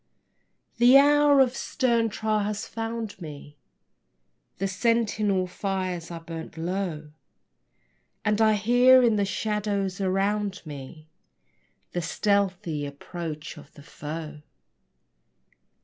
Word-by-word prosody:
The 245 Hz, +3 st, +8 dB
hour 290 Hz, 0 st, +5 dB
of 255 Hz, -1 st, +2 dB
stern 235 Hz, -6 st, 0 dB
trial 215 Hz, 0 st, -1 dB
has 210 Hz, +1 st, -3 dB
found 225 Hz, -3 st, -5 dB
me: 145 Hz, -2 st, -9 dB, 1.0 s
The 195 Hz, -, -1 dB
sentinel 210 Hz, -2 st, +1 dB
fires 185 Hz, -2 st, -3 dB
are 170 Hz, -1 st, -6 dB
burnt 165 Hz, -1 st, -8 dB
low, 165 Hz, -3 st, -3 dB, 1.1 s
And 210 Hz, +1 st, +2 dB
I 220 Hz, -1 st, +5 dB
hear 245 Hz, +5 st, +5 dB
in 225 Hz, -3 st, +3 dB
the 200 Hz, -, +2 dB
shadows 200 Hz, -2 st, -2 dB
around 195 Hz, +1 st, 0 dB
me 150 Hz, +1 st, -9 dB, 0.8 s
The 175 Hz, -, -2 dB
stealthy 185 Hz, -4 st, 0 dB
approach 155 Hz, +2 st, -7 dB
of 145 Hz, -, -16 dB
the 145 Hz, -, -13 dB
foe. 150 Hz, 0 st, -7 dB
195 Hz, 105 wpm, -26 LUFS, 165-225 Hz, 1.1 s, The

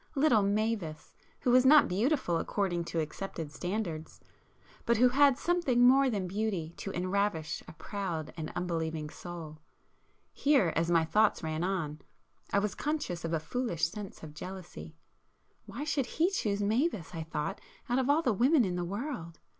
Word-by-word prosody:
—little 275 Hz, -6 st, +4 dB
Mavis, 200 Hz, -5 st, -1 dB, 0.3 s
who 245 Hz, -, +2 dB
was 250 Hz, +1 st, +6 dB
not 295 Hz, +3 st, +7 dB
beautiful 215 Hz, -, +1 dB
according 180 Hz, -4 st, -1 dB
to 165 Hz, -, -2 dB
accepted 160 Hz, 0 st, -4 dB
standards, 175 Hz, -2 st, -4 dB, 0.6 s
but 235 Hz, -1 st, +2 dB
who 250 Hz, +2 st, +6 dB
had 275 Hz, 0 st, +5 dB
something 285 Hz, -9 st, +2 dB
more 270 Hz, +1 st, +5 dB
than 200 Hz, -6 st, -1 dB
beauty 190 Hz, -4 st, -2 dB
to -, -, -5 dB
enravish 185 Hz, -2 st, -1 dB
a -, -, -10 dB
proud 170 Hz, -4 st, -4 dB
and 155 Hz, -2 st, -5 dB
unbelieving 160 Hz, -3 st, -2 dB
soul,—here, 175 Hz, -, -3 dB
as 165 Hz, +1 st, +1 dB
my 165 Hz, -2 st, +4 dB
thoughts 210 Hz, +2 st, +2 dB
ran 160 Hz, +1 st, -2 dB
on, 165 Hz, -5 st, -2 dB, 0.5 s
I -, -, +2 dB
was 200 Hz, -1 st, +1 dB
conscious 295 Hz, -, -3 dB
of 165 Hz, -, -3 dB
a 165 Hz, -, +1 dB
foolish 170 Hz, -2 st, -1 dB
sense 205 Hz, -1 st, -8 dB
of 155 Hz, -2 st, -8 dB
jealousy,—why 180 Hz, -, -10 dB
should 285 Hz, -4 st, 0 dB
he 340 Hz, +4 st, +1 dB
choose 205 Hz, -, -1 dB
Mavis, 220 Hz, -, 0 dB
I 165 Hz, -, -4 dB
thought, 160 Hz, +4 st, -4 dB, 0.3 s
out 245 Hz, +2 st, +1 dB
of 260 Hz, +1 st, 0 dB
all 305 Hz, +3 st, +4 dB
[p 245 Hz, -, +3 dB
345] 200 Hz, -, -4 dB
women 260 Hz, 0 st, +5 dB
in 180 Hz, -2 st, -2 dB
the 175 Hz, -, -1 dB
world? 200 Hz, -, -5 dB
195 Hz, 160 wpm, -31 LUFS, 165-245 Hz, 0.6 s, not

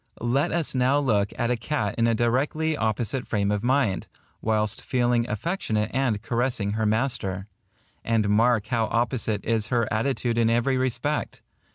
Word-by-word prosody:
10 120 Hz, +1 st, -2 dB
Let 140 Hz, +2 st, +2 dB
us 165 Hz, -2 st, 0 dB
now 130 Hz, +2 st, +3 dB
look 105 Hz, -8 st, +1 dB
at 120 Hz, -1 st, 0 dB
a -, -, +2 dB
cat 115 Hz, -3 st, -2 dB
in 115 Hz, 0 st, +2 dB
a 115 Hz, -, +2 dB
directly 140 Hz, +7 st, +1 dB
opposite 115 Hz, +2 st, -1 dB
frame 100 Hz, -2 st, 0 dB
of 105 Hz, +1 st, -1 dB
mind, 125 Hz, -7 st, +1 dB, 0.3 s
whilst 110 Hz, -1 st, 0 dB
feeling 120 Hz, -2 st, +1 dB
affectionate 110 Hz, -, -1 dB
and 130 Hz, -5 st, +1 dB
caressing 120 Hz, -3 st, -1 dB
her 110 Hz, +1 st, 0 dB
master; 110 Hz, -5 st, -1 dB, 0.6 s
and 115 Hz, -3 st, +1 dB
mark 110 Hz, +1 st, +3 dB
how 115 Hz, 0 st, 0 dB
opposite 115 Hz, -3 st, -1 dB
is 110 Hz, -2 st, 0 dB
her 120 Hz, -3 st, +1 dB
attitude 120 Hz, 0 st, 0 dB
in 115 Hz, -1 st, +3 dB
every 120 Hz, +3 st, +2 dB
respect. 130 Hz, +3 st, -2 dB
115 Hz, 165 wpm, -25 LUFS, 110-130 Hz, 0.6 s, now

